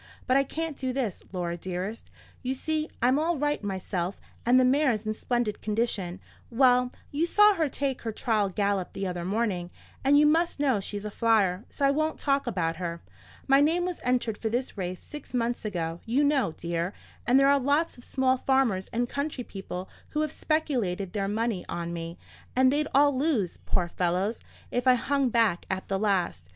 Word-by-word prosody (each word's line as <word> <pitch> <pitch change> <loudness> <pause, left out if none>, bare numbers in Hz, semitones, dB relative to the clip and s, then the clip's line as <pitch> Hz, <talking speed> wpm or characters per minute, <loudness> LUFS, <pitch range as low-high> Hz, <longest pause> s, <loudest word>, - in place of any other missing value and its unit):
But 255 - +2
I 275 - +5
can't 320 +2 -4
do 260 -2 -3
this, 245 -8 -2
Laura 175 -2 -2
dearest. 185 +5 -5 0.3
You 255 +1 -2
see 310 +3 -2
I'm 255 +4 +4
all 330 +1 +1
right 295 -3 0
myself, 190 -2 -3 0.3
and 250 +1 +6
the 255 - +5
mare's 255 -5 +2
in 215 - 0
splendid 240 -1 -1
condition;—well, 235 +4 0 0.2
you 310 +4 +1
saw 420 +3 +6
her 320 -6 0
take 270 -1 -2
her 225 - -3
trial 215 -3 0
gallop 200 -1 -1
the 195 - -3
other 180 -2 -3
morning, 190 -2 -1 0.3
and 280 +2 +5
you 300 - +6
must 325 +1 +2
know 265 -7 +2
she's 205 +1 -5
a 210 - -4
flyer, 210 -4 +2
so 280 - -1
I 275 - +5
won't 310 +2 0
talk 275 -1 +1
about 165 -3 -1
her. 170 -2 -4 0.4
My 275 0 +6
name 335 +4 +2
was 360 -2 -4
entered 245 -3 0
for 220 - -1
this 245 +3 -2
race 185 -2 -4
six 295 -3 -9
months 240 -1 -1
ago, 170 -4 -3
you 255 +6 +2
know, 285 - +2
dear; 170 +3 -3 0.3
and 250 +3 +6
there 275 0 +5
are 280 - +4
lots 285 +5 +1
of 245 - -14
small 260 0 +1
farmers 255 -8 +1
and 240 +1 -1
country 280 -1 -3
people 190 -3 -7 0.2
who 300 - -1
have 305 -2 -1
speculated 235 - -1
their 200 -2 -1
money 220 -1 -1
on 170 0 -3
me; 170 0 -5 0.4
and 260 +1 +5
they'd 300 +1 +1
all 285 0 +5
lose, 255 - 0
poor 180 -2 +1
fellows, 180 +5 -1 0.3
if 245 +1 -1
I 255 - +7
hung 275 +1 +1
back 225 -7 +2
at 190 0 -3
the 195 0 0
last. 180 - 0
235 Hz, 190 wpm, -27 LUFS, 190-275 Hz, 0.4 s, I